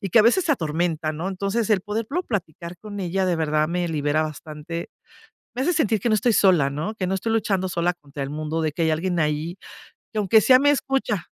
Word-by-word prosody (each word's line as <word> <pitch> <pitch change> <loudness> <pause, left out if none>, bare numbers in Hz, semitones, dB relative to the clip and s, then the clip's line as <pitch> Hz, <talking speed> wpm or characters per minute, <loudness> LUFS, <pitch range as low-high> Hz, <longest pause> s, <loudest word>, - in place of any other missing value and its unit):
y 195 - -3
que - - +5
a 215 - +8
veces 290 - +4
se 310 - +4
atormentan, 160 - -1
¿no? 175 +4 -2
Entonces, 200 +4 -2
el 205 -3 +4
poderlo 225 - -2
platicar 175 - -5
con 205 +1 -8
ella 190 +1 -1
de 175 -2 +1
verdad 155 -1 +1
me 175 +1 -1
libera 150 -1 0
bastante, 155 +2 -6 0.7
me 255 - -2
hace 355 - +2
sentir 225 - +1
que 235 - 0
no - - +4
estoy 215 +2 +2
sola, 180 -10 +4
¿no?, 155 +10 -4
que 185 - -2
no 190 - 0
estoy 225 +4 -2
luchando 195 -4 0
sola 175 +1 0
contra 145 -4 -8
el 135 - -3
mundo, 155 +2 -3
de 155 -2 0
que 165 - -3
hay 160 - +2
alguien 175 +3 -1
ahí, 155 +3 -1 0.6
que 220 - -3
aunque 210 +2 +5
sea 255 +4 +6
me 285 +2 +4
escucha. 270 - -1
180 Hz, 230 wpm, -23 LUFS, 155-215 Hz, 0.7 s, a